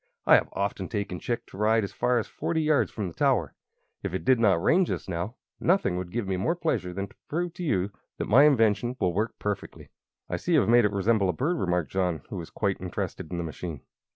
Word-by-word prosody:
"I - - +6
have - - +5
often 100 -1 -2
taken 100 -5 -3
Chick 120 - -3
to - - -13
ride 110 +1 +3
as 100 - -4
far 125 0 +1
as 115 - 0
forty 160 -1 -2
yards 155 -1 +3
from 105 -4 -4
the 85 - -7
tower. 125 - +1 0.5
If 90 - -3
it - - -4
did 130 -2 +4
not 100 -7 +4
rain, 185 - +4
just - - -3
now, 90 +6 -3 0.2
nothing 175 - +2
would 90 -1 -4
give 115 -2 -2
me 95 -1 -1
more 160 - 0
pleasure 160 - -1
than 100 +2 -4
to - - -21
prove 170 +2 -2
to 180 - -7
you 100 - 0 0.3
that - - -2
my 135 +7 +6
invention 120 -3 +3
will 90 -3 +1
work 105 +5 -1
perfectly." 105 -2 -5 0.4
"I - - -2
see 175 - -1
you 155 - +6
have 110 - 0
made 120 0 +6
it 105 - +2
resemble 100 0 +2
a - - +1
bird," 160 - -1
remarked 90 -3 0
John, 90 -6 -1
who 100 - -4
was 85 -2 -6
quite 100 -3 -2
interested 90 -3 -4
in 90 - -3
the 85 - -2
machine. 80 -2 -6
105 Hz, 240 wpm, -27 LUFS, 90-125 Hz, 0.5 s, I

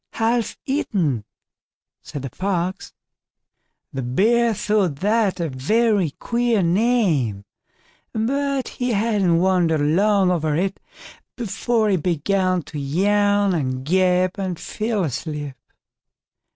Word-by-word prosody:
"Half 230 +1 0
eaten", 175 - -1 0.8
said 145 - -7
the 135 - -5
Fox. 185 -1 -2 1.0
The 135 - -3
Bear 220 - +2
thought 205 -6 +1
that 210 -1 +1
a 170 - -1
very 195 - +1
queer 235 -4 +1
name, 170 - +1 0.7
but 275 +4 -1
he 245 -1 -2
hadn't 200 -5 +2
wondered 175 -3 +2
long 190 +5 +3
over 160 -4 0
it 190 +4 -1 0.6
before 230 -1 0
he 190 - +2
began 185 +2 0
to 150 +1 -7
yawn 205 +6 +2
and 130 -5 -2
gape 185 +2 +2
and 185 -3 -3
fell 215 -2 -2
asleep. 150 -1 -4
190 Hz, 110 wpm, -22 LUFS, 160-220 Hz, 1.0 s, long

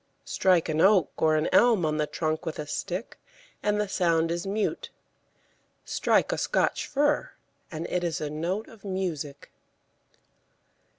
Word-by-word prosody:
Strike 180 -3 +2
an 160 0 0
oak 195 -1 +5
or 155 -1 +4
an 155 0 +1
elm 230 -8 +5
on 155 0 0
the 150 -1 0
trunk 155 +1 -2
with 160 -2 -4
a 150 - -4
stick, 185 +7 -5 0.4
and 210 0 +1
the 210 - 0
sound 165 -3 +1
is 170 +2 -3
mute; 210 +10 -2 1.0
strike - - +2
a - - -1
Scotch - - 0
fir, 290 +1 +1 0.4
and 160 0 -4
it 180 - -1
is 170 -2 -1
a 150 - -3
note 170 +8 -3
of 225 -3 -16
music. 175 -8 -4
175 Hz, 155 wpm, -27 LUFS, 155-200 Hz, 1.0 s, oak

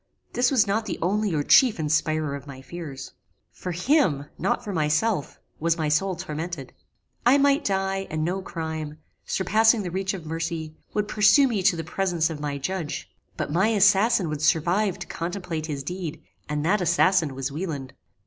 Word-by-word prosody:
This 245 0 +3
was 255 -6 +4
not 215 +2 -1
the 185 - -3
only 205 +3 0
or 145 - +1
chief 245 - +5
inspirer 155 -1 0
of 140 0 -9
my 135 -2 -9
fears. 140 -1 -8 0.4
For 180 - -6
him, 180 - +2
not 190 - 0
for 205 - -5
myself, 160 +3 0 0.2
was 165 +1 +1
my 155 -2 0
soul 185 +5 +1
tormented. 155 -3 -6 0.5
I 250 +4 +6
might 280 +1 +3
die, 195 0 -1
and 155 0 -1
no 185 +3 -1
crime, 160 -4 -5 0.3
surpassing 220 +3 +3
the 180 - -4
reach 190 +1 -2
of 170 -4 -9
mercy, 165 -1 -4 0.2
would 210 0 0
pursue 210 +7 +5
me 220 -6 -1
to 180 -1 +3
the 165 - -4
presence 170 -1 0
of 155 - -6
my 145 -1 -3
Judge; 165 +2 -4 0.3
but - - -3
my 185 +7 +3
assassin 205 -1 +4
would 150 -1 -4
survive 170 +6 +2
to - - -7
contemplate 170 -2 -4
his 140 -3 -4
deed, 175 0 -5 0.3
and 150 0 -1
that 195 +4 +2
assassin 170 -3 +3
was 135 +1 -3
Wieland! 145 -5 -5
175 Hz, 175 wpm, -25 LUFS, 155-195 Hz, 0.5 s, I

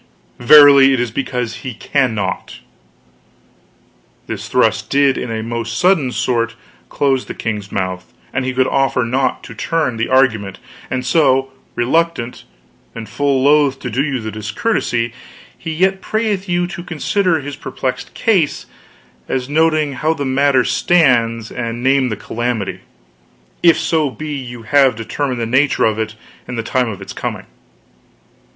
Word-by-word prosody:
Verily 140 +1 +8
it 130 - 0
is 120 -2 -1
because 125 -2 -3
he 130 -4 -7
cannot.' 110 -9 -1 1.7
This - - -6
thrust - - +1
did 140 -1 +3
in 125 - -4
a 110 -1 -3
most 115 0 -4
sudden 175 -8 +3
sort 115 -2 -1 0.3
close 135 -2 0
the - - -7
king's 105 -3 -4
mouth, 95 -1 -4 0.2
and 130 - 0
he 130 - -1
could 130 0 +2
offer 135 -2 +1
naught 130 +3 -1
to - - -9
turn 155 -8 -1
the 115 - -1
argument; 110 -7 +2 0.3
and 130 -1 -3
so, 135 -2 +2 0.2
reluctant, 130 -1 -1 0.5
and 115 -1 -7
full 140 -2 0
loth 145 -1 +4
to 125 - -5
do 125 +5 0
you 140 -4 -2
the 110 -1 -5
discourtesy, 115 - -1 0.4
he 165 - -6
yet 190 +4 +1
prayeth 210 -3 -2
you 175 0 +1
to 175 0 -7
consider 175 +1 0
his 145 0 -6
perplexed 130 -2 -4
case, 185 -10 +1 0.6
as 130 0 -2
noting 155 -1 +2
how 155 +5 0
the 145 - -3
matter 130 0 +3
stands, 120 -10 +2
and 120 0 -4
name 135 -1 +3
the 110 - -2
calamity 110 -4 -3 0.8
if 170 -2 +5
so 160 -2 +1
be 155 +3 -6
you 120 -4 -7
have 135 +1 +4
determined 125 +3 -3
the 115 - -1
nature 130 +4 +2
of 110 -1 0
it 110 0 -3 0.3
and 125 - -5
the 115 - -2
time 125 +1 0
of 100 -2 -7
its - - -9
coming. - - -5
130 Hz, 155 wpm, -17 LUFS, 115-150 Hz, 1.7 s, Verily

